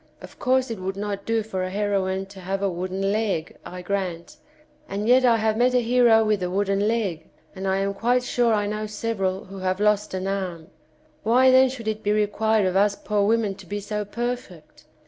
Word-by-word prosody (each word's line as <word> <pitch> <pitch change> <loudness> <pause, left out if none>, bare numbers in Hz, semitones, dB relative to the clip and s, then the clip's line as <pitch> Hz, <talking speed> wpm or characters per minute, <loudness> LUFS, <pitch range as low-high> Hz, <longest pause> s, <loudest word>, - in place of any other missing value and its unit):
Of - - -13
course 255 -1 +1
it 220 - -5
would 190 +1 -4
not 200 -1 -4
do 225 -1 +1
for 190 -3 -4
a 185 - -2
heroine 195 -1 -1
to 195 0 -13
have 195 +2 -3
a 200 - +2
wooden 185 +3 -2
leg, 200 -6 -1
I 180 0 -8
grant, 190 - -3 0.5
and 205 +2 -3
yet 255 +2 +5
I 235 -2 +5
have 220 0 0
met 250 +2 +3
a - - +5
hero 235 -2 +4
with 210 -2 +1
a 180 - -1
wooden 195 +2 0
leg, 200 -8 -2 0.3
and 190 0 -4
I 190 0 +1
am 195 0 -1
quite 245 +4 +1
sure 245 -1 +1
I 210 -2 +1
know 215 +1 -3
several 200 -3 -2
who 195 +1 -9
have 185 0 -1
lost 210 -1 +1
an 185 0 -3
arm; 185 -4 -4 0.5
why 255 +4 +4
then 260 0 +6
should 245 -4 -7
it 215 0 -2
be 205 - 0
required 215 0 +1
of 185 0 0
us 200 +1 +3
poor 210 0 -1
women 220 -2 +1
to 190 -1 -14
be 205 +2 -3
so 210 +1 -3
perfect 235 -6 -6
205 Hz, 215 wpm, -24 LUFS, 190-225 Hz, 0.5 s, then